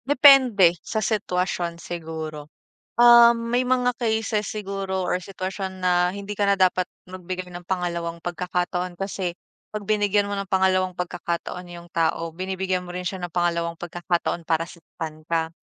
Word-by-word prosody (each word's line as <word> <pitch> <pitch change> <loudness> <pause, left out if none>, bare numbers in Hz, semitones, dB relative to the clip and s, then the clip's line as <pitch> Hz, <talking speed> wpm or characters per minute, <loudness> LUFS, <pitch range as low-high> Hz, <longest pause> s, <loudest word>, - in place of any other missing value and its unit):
Depende 260 -10 +7
sa 220 - -4
sitwasyon 180 -5 -1
siguro, 160 -3 -6 0.5
ah. 235 0 +9
May 235 +2 0
mga 250 -1 +1
cases 220 -2 0
siguro 195 -2 -3
or 180 0 0
sitwasyon 190 0 -5
na 180 0 +2
hindi 200 0 -6
ka 205 - +2
na 200 - +4
dapat 185 -1 +3 0.2
magbigay 185 0 -6
ng 175 0 -9
pangalawang 170 -2 -2
pagkakataon, 180 0 -2
kasi 190 -1 -3 0.4
pag 215 - -3
binigyan 205 -1 +2
mo 200 - -2
ng 200 - -2
pangalawang 185 -1 +2
pagkakataon 175 0 -4
'yung 175 -1 -11
tao, 165 0 0
binibigyan 185 +1 -2
mo 175 - -8
rin 180 - -3
siya 180 +1 -3
ng 175 - -11
pangalawang 170 -1 0
pagkakataon 175 0 -2
para 165 +1 0
saktan 160 -2 -9
ka. 165 0 0
185 Hz, 150 wpm, -24 LUFS, 175-200 Hz, 0.5 s, ah